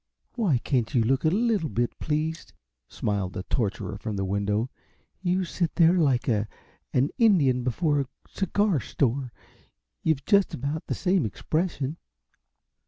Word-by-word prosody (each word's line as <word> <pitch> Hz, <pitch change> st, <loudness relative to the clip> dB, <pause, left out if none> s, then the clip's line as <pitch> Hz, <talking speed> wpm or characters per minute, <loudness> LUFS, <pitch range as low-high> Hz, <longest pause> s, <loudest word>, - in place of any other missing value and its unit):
"Why 190 Hz, -, +2 dB
can't 125 Hz, +1 st, -1 dB
you 120 Hz, -, +4 dB
look 130 Hz, +6 st, +1 dB
a -, -, +6 dB
little 210 Hz, -3 st, +1 dB
bit 120 Hz, 0 st, -1 dB
pleased?" 155 Hz, +2 st, -2 dB, 0.4 s
smiled 100 Hz, -3 st, -2 dB
the 90 Hz, -, -4 dB
torturer 100 Hz, -3 st, -2 dB
from 110 Hz, 0 st, -4 dB
the 95 Hz, 0 st, -1 dB
window. 105 Hz, +5 st, 0 dB, 0.5 s
"You 185 Hz, 0 st, +1 dB
sit 170 Hz, -1 st, -2 dB
there 170 Hz, -1 st, +6 dB
like 135 Hz, -6 st, +2 dB
a 105 Hz, -3 st, +1 dB, 0.4 s
an 130 Hz, +3 st, +2 dB
Indian 150 Hz, -, +4 dB
before 145 Hz, +4 st, +1 dB
a 135 Hz, -, -4 dB, 0.2 s
cigar 200 Hz, -3 st, +1 dB
store. 130 Hz, 0 st, -1 dB, 0.7 s
You've 150 Hz, -4 st, +1 dB
just 200 Hz, -2 st, +3 dB
about 145 Hz, +5 st, -4 dB
the -, -, -1 dB
same 185 Hz, -3 st, +2 dB
expression." 155 Hz, -, -2 dB
140 Hz, 145 wpm, -26 LUFS, 115-170 Hz, 0.7 s, a